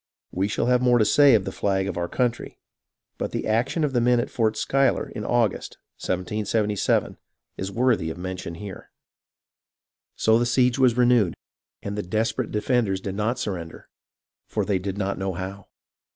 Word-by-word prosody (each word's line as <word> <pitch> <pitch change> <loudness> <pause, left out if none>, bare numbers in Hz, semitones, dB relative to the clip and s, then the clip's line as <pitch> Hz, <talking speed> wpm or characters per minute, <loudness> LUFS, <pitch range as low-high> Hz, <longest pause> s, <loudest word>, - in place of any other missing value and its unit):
We 95 +2 0
shall 105 - -1
have 125 0 +3
more 125 -1 +4
to 110 - +3
say 140 +1 +6
of 110 - +1
the - - -3
flag 95 -1 0
of 95 - -3
our 85 0 -2
country, 120 +4 -2 0.6
but - - -2
the - - -3
action 120 +9 0
of 145 -3 0
the 120 - +2
men 120 0 +3
at 120 - -3
Fort 110 -2 0
Schuyler 135 0 +1
in 105 - -6
August, 115 -2 0 0.2
1777, 105 +2 -1 0.4
is 95 +1 -5
worthy 115 -7 +1
of 80 - -6
mention 90 -2 -5
here. 100 +1 -9 1.3
So 110 +1 +3
the 120 - +1
siege 125 +1 +2
was 125 -2 +4
renewed, 120 -7 +3 0.5
and 100 0 -4
the 105 - -2
desperate 110 +5 -1
defenders 105 -3 0
did 95 0 -5
not 110 +5 -1
surrender, 85 -8 -6 0.6
for - - -2
they 100 -3 0
did 95 +1 -4
not 100 -1 -2
know 95 0 -2
how. 95 +2 -7
105 Hz, 175 wpm, -24 LUFS, 95-120 Hz, 1.3 s, say